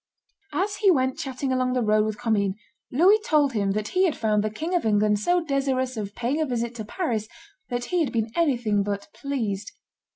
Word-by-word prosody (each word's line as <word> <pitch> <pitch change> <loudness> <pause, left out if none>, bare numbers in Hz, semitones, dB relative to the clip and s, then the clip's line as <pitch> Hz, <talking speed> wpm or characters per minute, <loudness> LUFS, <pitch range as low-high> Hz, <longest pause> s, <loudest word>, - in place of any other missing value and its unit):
As 400 +2 -1
he 410 - +4
went 260 -3 +2
chatting 270 -3 -3
along 255 0 +1
the 250 -1 +1
road 215 0 +3
with 215 0 -3
Commynes, 210 -5 0 0.4
Louis 370 - +5
told 295 - +2
him 200 -3 0
that 210 0 -2
he 370 +1 +3
had 325 - 0
found 215 -2 +1
the 215 - 0
King 315 +12 -4
of 350 - +2
England 210 -1 +2
so 350 +9 +2
desirous 265 -3 0
of 205 -2 -5
paying 255 +6 -1
a - - +2
visit 235 -2 -2
to 220 - -5
Paris 225 - -2 0.4
that 245 0 -2
he 355 - +3
had 275 - -2
been 225 -1 -1
anything 240 -11 +2
but 200 0 -3
pleased. 225 -9 -3
245 Hz, 205 wpm, -25 LUFS, 215-290 Hz, 0.4 s, Louis